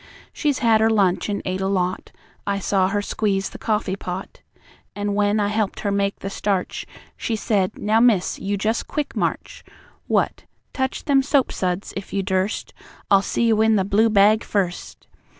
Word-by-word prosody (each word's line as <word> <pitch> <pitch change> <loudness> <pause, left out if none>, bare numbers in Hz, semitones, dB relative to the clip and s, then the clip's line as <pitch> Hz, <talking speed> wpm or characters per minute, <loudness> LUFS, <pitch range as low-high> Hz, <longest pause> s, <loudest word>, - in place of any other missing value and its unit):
She's 290 -4 0
had 220 -1 +5
her 220 - +4
lunch, 200 -3 +2
and 205 - -2
ate 185 +1 -2
a 190 - 0
lot; 185 -2 -1 0.4
I 200 0 0
saw 190 -1 +1
her 205 +1 -1
squeeze 195 -2 -1
the - - -10
coffee 210 -3 -1
pot. 185 0 -7 0.5
An' 205 0 -2
when 205 +1 +2
I 205 -1 +1
helped 210 -1 -1
her 200 - -1
make 200 0 -1
the 195 - -4
starch, 195 -2 -2 0.3
She 230 - -2
said: 205 -2 0
'Now, 215 +2 +2
Miss, 230 -6 +3
you 200 +1 -2
just 220 +3 -1
quick 300 -2 -3
march! - - -3 0.4
What? - - 0 0.3
Touch 265 0 -2
them 275 -2 +4
soap 275 -1 +2
suds 180 +1 -2
if 195 - -7
you 200 -1 0
durst; 190 +2 -1 0.4
I'll 195 -1 +6
see 205 - -1
you 220 -2 +3
in 220 0 +4
the 190 -2 +2
blue 215 +3 +3
bag 215 +1 +4
first!' 185 -4 -3
205 Hz, 185 wpm, -22 LUFS, 195-220 Hz, 0.5 s, I'll